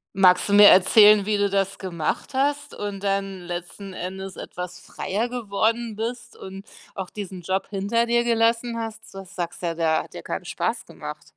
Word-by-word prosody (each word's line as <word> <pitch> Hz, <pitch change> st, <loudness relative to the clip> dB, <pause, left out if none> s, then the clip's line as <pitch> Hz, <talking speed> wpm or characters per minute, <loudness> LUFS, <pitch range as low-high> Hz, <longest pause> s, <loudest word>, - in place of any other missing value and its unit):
Magst 185 Hz, 0 st, +4 dB
du -, -, +1 dB
mir 205 Hz, 0 st, +9 dB
erzählen, 205 Hz, +2 st, +6 dB
wie 210 Hz, -1 st, +1 dB
du 200 Hz, -1 st, +1 dB
das 195 Hz, 0 st, 0 dB
gemacht 175 Hz, -, -3 dB
hast 290 Hz, +2 st, 0 dB
und 205 Hz, -1 st, -6 dB
dann 195 Hz, -1 st, -1 dB
letzten 175 Hz, +2 st, -7 dB
Endes 190 Hz, +1 st, -6 dB
etwas 180 Hz, 0 st, -7 dB
freier 220 Hz, +6 st, -3 dB
geworden 230 Hz, -1 st, -1 dB
bist 235 Hz, +3 st, -5 dB
und 195 Hz, +2 st, -10 dB, 0.3 s
auch 190 Hz, -2 st, -6 dB
diesen 190 Hz, -3 st, -7 dB
Job 190 Hz, +2 st, -2 dB
hinter 210 Hz, +4 st, 0 dB
dir 235 Hz, 0 st, +2 dB
gelassen 230 Hz, 0 st, +1 dB
hast? 225 Hz, -1 st, -7 dB
Das 195 Hz, -1 st, -10 dB
sagst 175 Hz, -1 st, -4 dB
ja, 170 Hz, -1 st, -2 dB
der 160 Hz, -1 st, +1 dB
hat -, -, -17 dB
dir -, -, -8 dB
keinen -, -, -5 dB
Spaß -, -, -3 dB
gemacht. -, -, -8 dB
200 Hz, 180 wpm, -24 LUFS, 185-225 Hz, 0.3 s, mir